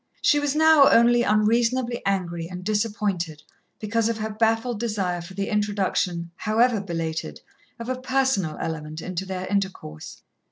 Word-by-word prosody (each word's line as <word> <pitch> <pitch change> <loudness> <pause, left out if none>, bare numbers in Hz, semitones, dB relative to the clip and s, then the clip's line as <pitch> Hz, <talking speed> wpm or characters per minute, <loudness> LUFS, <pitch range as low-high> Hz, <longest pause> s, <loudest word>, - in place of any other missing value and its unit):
She 295 - +3
was 290 0 -1
now 315 -2 +6
only 240 +1 +5
unreasonably 235 +3 +1
angry 175 -4 -1
and 180 0 -7
disappointed 205 -7 -2 0.4
because 225 +1 0
of 230 - -2
her 220 0 -3
baffled 225 +1 0
desire 195 -6 -2
for 175 +2 -11
the 200 0 -2
introduction, 195 -5 -1
however 225 0 +2
belated, 160 - -4 0.4
of 230 - -7
a 255 0 -3
personal 260 - 0
element 155 -1 -5
into 185 +1 -4
their 185 -1 -4
intercourse. 190 - -4
210 Hz, 145 wpm, -24 LUFS, 180-235 Hz, 0.4 s, now